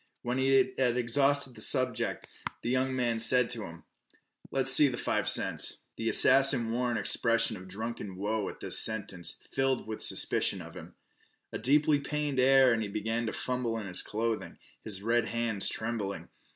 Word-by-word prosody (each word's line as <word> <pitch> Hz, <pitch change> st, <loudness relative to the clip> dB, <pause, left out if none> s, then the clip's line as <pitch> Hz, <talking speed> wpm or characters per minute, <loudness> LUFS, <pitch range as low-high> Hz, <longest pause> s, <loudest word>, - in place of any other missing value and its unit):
When 125 Hz, +2 st, -3 dB
he 135 Hz, 0 st, +2 dB
had 125 Hz, -2 st, +1 dB
exhausted 135 Hz, +2 st, +1 dB
the -, -, -11 dB
subject, 130 Hz, -4 st, -2 dB, 0.4 s
the 120 Hz, -, -2 dB
young 130 Hz, +1 st, -1 dB
man 120 Hz, -3 st, -1 dB
said 125 Hz, +1 st, +4 dB
to 115 Hz, -4 st, -3 dB
him: 85 Hz, 0 st, -13 dB, 0.7 s
"Let's 135 Hz, 0 st, 0 dB
see 145 Hz, +1 st, +5 dB
th' 120 Hz, -, -6 dB
five -, -, -1 dB
cents." -, -, +2 dB
The -, -, -3 dB
assassin 130 Hz, -4 st, +6 dB
wore 125 Hz, +1 st, -2 dB
an 120 Hz, -, -2 dB
expression 115 Hz, +2 st, +2 dB
of 95 Hz, -1 st, -12 dB
drunken 105 Hz, 0 st, -7 dB
woe 105 Hz, +2 st, -3 dB
at -, -, -12 dB
this -, -, +1 dB
sentence, 100 Hz, -5 st, -2 dB
filled 135 Hz, -1 st, -1 dB
with 110 Hz, 0 st, -7 dB
suspicion -, -, +2 dB
of -, -, -11 dB
him. -, -, -12 dB, 0.6 s
With -, -, -7 dB
a -, -, -22 dB
deeply 145 Hz, +3 st, +2 dB
pained 145 Hz, -1 st, -4 dB
air 130 Hz, -1 st, +4 dB
he 110 Hz, -, -4 dB
began 110 Hz, +3 st, -3 dB
to -, -, -3 dB
fumble 125 Hz, -3 st, -4 dB
in 110 Hz, -, -6 dB
his 90 Hz, -2 st, +2 dB
clothing, 115 Hz, +1 st, -4 dB, 0.3 s
his 100 Hz, -2 st, -4 dB
red 115 Hz, +1 st, 0 dB
hands 115 Hz, -4 st, 0 dB
trembling. 110 Hz, -3 st, -5 dB
120 Hz, 180 wpm, -28 LUFS, 110-130 Hz, 0.7 s, assassin